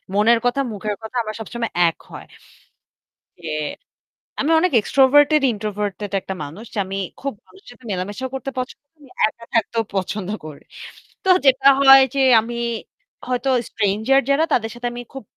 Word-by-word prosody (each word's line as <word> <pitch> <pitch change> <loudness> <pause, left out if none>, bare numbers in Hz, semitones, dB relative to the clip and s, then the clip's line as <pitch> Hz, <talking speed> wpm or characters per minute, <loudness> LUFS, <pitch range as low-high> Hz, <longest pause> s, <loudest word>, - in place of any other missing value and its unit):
মনের 225 +3 +4
কথা, 245 +3 +1
মুখের 210 +1 -4
কথা 220 +3 -9
আমার 215 -1 -6
সবসময় 230 +1 -5 0.2
এক 165 - -10
হয়। - - -9 1.2
ইয়ে 160 -2 -4 0.9
আমি 305 - +1
অনেক 365 +2 +1
extorverted-introverted 230 - +2
একটা 190 - -6
মানুষ 155 +10 -9
যে - - -7
আমি 195 +1 -5 0.2
খুব 275 0 -3
মানুষের 385 - -20
সাথে 245 0 -18
মেলামেশা 200 +7 -4
করতে 265 0 -4
পছন্দ 255 0 -4
করি। 325 - -64
আমি 290 - -17 0.2
একা 230 +1 -11
থাকতেও 230 0 +1
পছন্দ 195 0 -3 0.2
করি। 150 -2 -10 0.6
তো 380 - -1 0.2
যেটা 270 0 +4
হয় 270 0 +9
যে 275 - +2 0.2
আমি 235 +2 -5 0.7
হয়তো 250 +1 -1 0.2
stranger 220 +6 +1
যারা 280 +3 +3
তাদের 225 -2 +1
সাথে 240 0 -4
আমি 240 - -6
খুব 270 - -8
235 Hz, 155 wpm, -20 LUFS, 205-270 Hz, 1.2 s, হয়